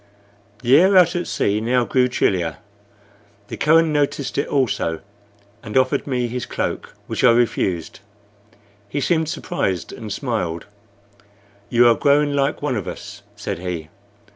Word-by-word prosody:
The 125 +4 +6
air 190 +2 +5
out 175 -1 +5
at 175 0 -2
sea 105 +1 0
now 120 +2 +1
grew 125 0 +2
chillier. 90 - 0 0.9
The - - -6
Kohen 160 +1 +4
noticed 145 -2 -1
it 140 - -1
also, 120 - -1 0.6
and 105 +3 -3
offered 130 +2 +1
me 125 -3 -1
his 125 +1 -5
cloak, - - -4
which - - -3
I 125 - +7
refused. 110 -9 0 0.9
He 145 - -2
seemed 160 +1 +1
surprised, 160 - -3
and 110 -2 -8
smiled. 95 - -3 1.0
"You 120 0 +5
are 120 - +6
growing 145 +3 +2
like 140 +1 0
one 140 -4 0
of 100 - -5
us," - - -8
said - - -5
he. 85 -3 -5
125 Hz, 145 wpm, -21 LUFS, 105-145 Hz, 1.0 s, I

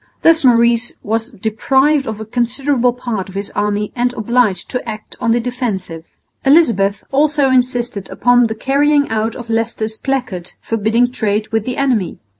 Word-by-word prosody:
Thus 330 -1 +5
Maurice 235 -1 +3
was 225 +2 -2
deprived 265 +6 +1
of 220 -1 -4
a 220 - -6
considerable 245 +2 0
part 235 -6 -4
of 190 - -12
his 200 +1 -4
army 210 0 -1
and 245 0 +1
obliged 220 -5 0
to 250 -2 -3
act 215 0 -8
on 230 - +1
the 235 - +3
defensive. 215 -10 -4 0.4
Elizabeth 235 - +3
also 285 -1 +2
insisted 245 -5 0
upon 245 -1 +3
the 220 - -4
carrying 285 +4 +2
out 220 +1 -1
of 240 -2 -8
Leicester's 225 -1 -2
placard 235 -11 -3
forbidding 225 +2 0
trade 215 -3 -1
with 225 -1 0
the 250 - -3
enemy. 245 -10 0
235 Hz, 160 wpm, -17 LUFS, 215-255 Hz, 0.4 s, Thus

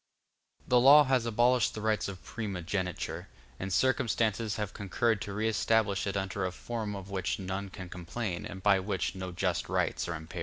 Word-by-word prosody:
The 125 - +5
law 140 +4 +9
has 130 -4 +1
abolished 120 +1 +3
the 110 - -5
rights 110 0 +1
of 95 -2 -8
primogeniture, 95 -4 -3 0.3
but 95 +1 -4
circumstances 115 -2 +1
have 105 -2 -3
concurred 105 +2 0
to 100 - -5
re 110 +2 0
establish 110 -2 +1
it 100 - -1
under 95 +1 -2
a 90 - -1
form 110 +1 -4
of 100 0 -8
which 95 -2 -1
none 95 +1 -4
can 90 -1 -8
complain, 90 +2 -4
and 95 0 -9
by 100 -2 +5
which 95 -1 -2
no 95 -1 -5
just 85 - -1
rights - - 0
are 85 - -2
impaired. 80 +3 -7
100 Hz, 185 wpm, -30 LUFS, 95-110 Hz, 0.3 s, law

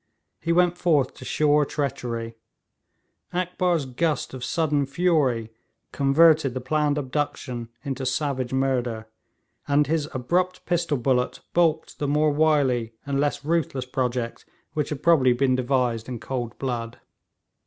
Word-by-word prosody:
He 165 - -1
went 175 0 +3
forth 150 -6 +2
to - - -11
sure 150 0 +3
treachery; 125 -6 -3 1.0
Akbar's 180 -3 0
gust 150 +4 -1
of 130 -2 -7
sudden 145 -2 0
fury 140 -8 +1 0.4
converted 145 -1 +4
the - - -1
planned 150 +3 0
abduction 130 -4 -3
into 135 -2 -4
savage 130 -2 -1
murder, 125 -4 -1 0.6
and 145 +1 +3
his 155 0 -1
abrupt 180 +7 -1
pistol 170 -4 0
bullet 125 0 0
baulked 160 -2 +1
the 145 - -1
more 150 +1 +3
wily 140 -7 +2
and 140 -1 -1
less 145 0 -1
ruthless 155 -5 0
project 125 -2 -2 0.3
which 150 -2 -1
had 150 -3 -5
probably 140 -7 +5
been 130 +1 +2
devised 125 -3 0
in 120 -2 -5
cold 120 -2 -4
blood. 120 -3 -4
140 Hz, 130 wpm, -25 LUFS, 125-155 Hz, 1.0 s, probably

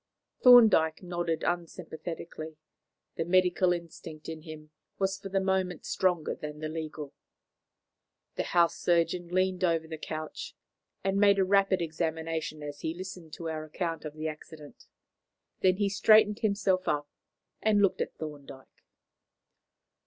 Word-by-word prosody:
Thorndyke 220 -11 +7
nodded 175 -2 -2
unsympathetically. 165 -2 -5 0.6
The - - 0
medical 180 +1 +3
instinct 165 -2 -6
in 160 -1 -6
him 155 -1 -11 0.3
was 195 0 -1
for 195 - -7
the 195 0 +1
moment 190 -3 -1
stronger 180 -4 0
than 150 0 -7
the 155 0 -4
legal. 155 -2 -6 1.2
The - - -2
house 170 -1 +5
surgeon 175 0 +1
leaned 185 +1 0
over 165 -2 +1
the 160 -1 -7
couch, 155 0 -6 0.5
and 195 +1 +1
made 200 -1 +5
a 190 - +3
rapid 195 -2 +3
examination 160 -1 -3
as 145 0 -7
he 160 +1 -3
listened 180 -3 -8
to 165 - -6
our 155 -1 -4
account 165 +1 -4
of 155 -1 -7
the 155 0 -3
accident. 155 -1 -10 0.7
Then 185 -1 +4
he 205 -1 +1
straightened 210 +1 +5
himself 200 -3 +1
up 145 0 0 0.5
and 215 -1 +3
looked 200 -2 +2
at - - -3
Thorndyke. 145 -4 -10
170 Hz, 140 wpm, -29 LUFS, 155-190 Hz, 1.2 s, Thorndyke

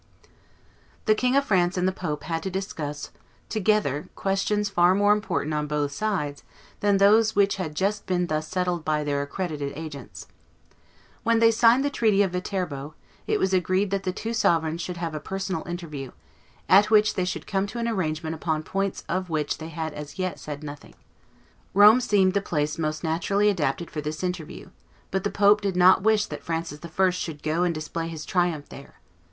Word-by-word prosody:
The 215 - +5
King 250 +4 +1
of 280 0 +3
France 185 -3 +2
and 180 +1 +1
the - - +2
pope 165 -5 -4
had 165 -1 -2
to 190 - -3
discuss 160 -6 -5 0.4
together 200 - 0
questions 200 +2 0
far 180 -2 +4
more 205 +1 +4
important 210 -7 -2
on 150 0 -1
both 145 -1 -1
sides 150 -5 -2 0.4
than 205 -1 +3
those 215 +3 +5
which 200 0 +3
had 160 -5 -4
just 200 +4 -1
been 180 -1 +1
thus 155 -1 -2
settled 180 -2 -1
by 155 -1 0
their 145 -1 -1
accredited 145 -1 -4
agents. 140 - -8 1.0
When 230 0 +2
they 230 0 +5
signed 235 +4 +4
the 285 - 0
treaty 215 -6 +3
of 190 - -1
Viterbo, 175 -6 -4 0.3
it - - +2
was 190 0 +1
agreed 185 +2 +1
that 195 -1 0
the 185 - -2
two 225 +5 -4
sovereigns 165 -6 +1
should 180 0 -5
have 165 -2 -3
a 155 - -3
personal 190 0 -4
interview, 155 -6 -6 0.6
at 200 +3 +6
which 215 -1 +4
they 185 - -1
should 180 - -3
come 195 0 -1
to 220 - -7
an 235 0 -1
arrangement 160 -7 -2
upon 160 -1 -2
points 195 +3 -2
of 185 -1 -2
which 155 -2 -1
they 160 0 -7
had 160 -1 -4
as 150 +2 -8
yet 185 -1 -3
said 150 0 -7
nothing. 145 -1 -9 0.8
Rome 210 +5 +8
seemed 195 -5 +3
the 200 - +1
place 150 -4 -2
most 155 0 -2
naturally 195 +6 +1
adapted 170 -3 -1
for 150 - -4
this 155 +3 -5
interview; 180 -3 -5 0.4
but 190 0 -1
the 205 - 0
pope 205 +1 +4
did 195 -3 -1
not 185 +1 +6
wish 215 +1 +3
that - - -7
Francis 165 -2 -4
I. 180 +3 +2
should 160 -4 -5
go 155 +2 0
and 175 -2 +1
display 165 +2 -4
his 160 -2 -7
triumph 175 -5 0
there. 140 - -12
180 Hz, 190 wpm, -25 LUFS, 155-200 Hz, 1.0 s, Rome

